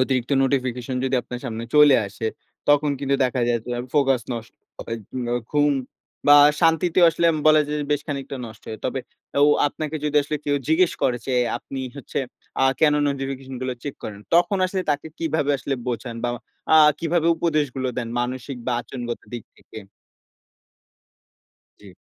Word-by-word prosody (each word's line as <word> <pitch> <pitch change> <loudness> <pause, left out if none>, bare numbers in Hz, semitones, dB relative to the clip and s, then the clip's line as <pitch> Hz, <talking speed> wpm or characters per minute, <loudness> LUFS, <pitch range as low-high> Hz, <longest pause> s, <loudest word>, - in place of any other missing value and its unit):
অতিরিক্ত 130 -1 0
নোটিফিকেশন 130 -2 -1
যদি 130 0 0
আপনার 125 0 -7
সামনে 115 -2 -4
চলে 150 -2 +8
আসে, 100 +3 -5 0.4
তখন 145 0 +4
কিন্তু 140 0 0
দেখা 125 0 -1
যায় 120 - +2
যে, - - -7 0.2
ফোকাস 135 -4 +3
নষ্ট 115 -1 -6 0.3
হয়। 115 - -4 0.3
অ্যা 120 - +1 0.2
ঘুম 145 0 +3 0.6
বা 145 - +9 0.2
শান্তিতে 165 +2 +3
আসলে 170 +1 +1 0.2
বলা 155 0 +7
যায় 150 +1 -2
যে, - - -2
বেশ 145 - +1
খানিকটা 140 -2 -4
নষ্ট 110 0 -13
হয়। 110 - -6
তবে - - -1 0.4
ও - - +6 0.2
আপনাকে 155 +1 -5
যদি 150 0 0
আসলে 150 +2 -3
কেউ 145 0 +1
জিজ্ঞেস 165 +2 +3
করে, 125 -2 +2
যে, 130 - -1 0.3
আপনি 135 - -8 0.2
হচ্ছে 140 - -5 0.4
আ - - +6 0.2
কেন 150 -2 +5
নোটিফিকেশন 135 -1 -4
গুলা 130 -1 -2
চেক 145 - -5
করেন? 100 -1 -7
তখন 185 +4 +3
আসলে 185 0 -2
তাকে 145 +1 -1
কিভাবে 160 -3 0
আসলে 135 +3 -2
বোঝান 120 -1 -4
বা - - +1 0.5
আ - - +8 0.2
কিভাবে 165 0 0
উপদেশগুলো 145 -6 0
দেন? 120 -2 -2
মানসিক 130 +2 -4
বা 125 - +1
আচরনগত 120 0 -6
দিক 120 -2 -6
থেকে? 110 - -12 2.0
জ্বী। 100 - -13
135 Hz, 165 wpm, -23 LUFS, 125-150 Hz, 2.0 s, বা